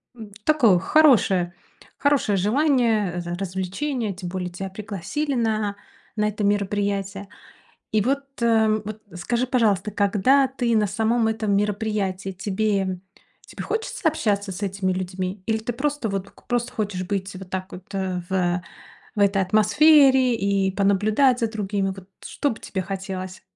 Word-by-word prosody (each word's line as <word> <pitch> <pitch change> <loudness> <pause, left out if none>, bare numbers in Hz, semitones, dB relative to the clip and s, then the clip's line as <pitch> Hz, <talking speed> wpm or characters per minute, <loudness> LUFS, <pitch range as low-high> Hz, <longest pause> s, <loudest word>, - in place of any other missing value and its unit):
н 220 -3 -10
такое 240 -13 +4
хорошее, 200 - +4 0.4
хорошее 275 -9 +2
желание, 225 - +2
э, - - -2
р 175 - -3
развлечений. 195 +5 -2
Тем 180 -1 -6
более 180 -1 -3
тебя 190 +2 -6
пригласили 205 - -4
на 215 -3 0 0.4
на 210 0 +2
это 210 0 -2
мероприятие. 200 -1 -1 0.6
И 215 - +3
вот, 275 +5 0 0.2
э, 225 -1 +4 0.2
вот 215 0 -7
скажи, 235 +8 -1
пожалуйста, 215 -6 +2
когда 210 +7 +3
ты 245 -3 -1
на 210 - +3
самом 225 +3 +1
этом 220 -2 0
мероприятии, 205 -2 -1
тебе 195 -1 -1 0.5
тебе - - -7
хочется 445 -6 -2
общаться 205 -9 -1
с 185 - -7
этими 195 -1 -1
людьми, 185 +1 -4
или 220 -1 +2
ты 225 +2 -3
просто 285 -3 -2
вот 195 -1 -2
п - - -16
к - - -21
просто 240 0 -1
хочешь 200 -4 -2
быть 195 -1 -3
вот 185 -1 -9
так 185 0 -4
вот, 185 0 -10
э, 185 -2 -2
в, - - -4
э, 180 -1 +1 0.5
в - - -3
этой 200 -1 +3
атмосфере 260 +5 +5
и 200 -2 +1
понаблюдать 210 +6 +3
за 230 - +1
другими? 200 -2 -1
Вот 185 -1 -12 0.2
что 285 - -1
бы 225 - -8
тебе 190 - -4
хотелось? 190 -1 -5
205 Hz, 160 wpm, -23 LUFS, 190-230 Hz, 0.6 s, атмосфере